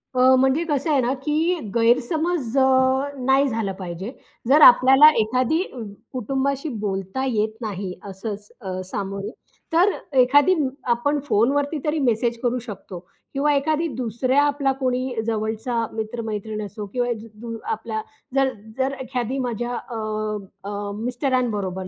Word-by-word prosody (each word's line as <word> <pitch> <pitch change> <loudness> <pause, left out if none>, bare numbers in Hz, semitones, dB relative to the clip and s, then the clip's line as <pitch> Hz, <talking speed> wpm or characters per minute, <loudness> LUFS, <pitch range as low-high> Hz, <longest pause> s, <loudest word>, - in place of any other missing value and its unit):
अ, 255 +1 +6
म्हणजे 265 +5 +3
कसं 290 +1 0
आहे 280 -3 +4
ना 250 +1 +1
की 320 +4 +1 0.2
गैरसमज 260 +4 +1
अ, 265 - +6 0.5
नाही 265 +2 +3
झालं 225 -5 -1
पाहिजे. 185 +4 -5 0.4
जर 295 +3 +6
आपल्याला 265 +3 +9
एखादी 255 +9 +1 0.5
कुटुंबाशी 270 +4 -1 0.2
बोलता 195 +6 -2
येत 220 -4 0
नाही 195 -4 -4 0.2
असं 200 +2 -5
स 205 +1 -18 0.4
सामोरे, 200 +1 -4 0.4
तर 360 +5 +5 0.3
एखादी 285 +8 +5 0.4
आपण 285 +5 0
फोनवरती 285 +7 +2
तरी 305 +1 0
मेसेज 235 +1 0
करू 250 0 +1
शकतो 195 -6 -8 0.3
किंवा 290 +2 +2
एखादी 310 +4 +1
दुसऱ्या 255 +3 +1
आपला 285 -1 +1
कोणी 255 -1 -1
जवळचा 220 +2 -2 0.2
मित्र-मैत्रीण 220 -1 -4
असो 205 +1 -7
किंवा 245 -1 0
ज 225 - -11
ज 230 -1 -5 0.2
आपला 220 0 -3 0.3
जर 270 -1 +4 0.3
जर 265 +1 0
एखादी 255 0 -3
माझ्या 240 -1 -2
अ, 235 -1 -6 0.7
अ, 205 0 -4
मिस्टरांबरोबर 230 -6 -1
245 Hz, 130 wpm, -23 LUFS, 220-275 Hz, 0.7 s, आपल्याला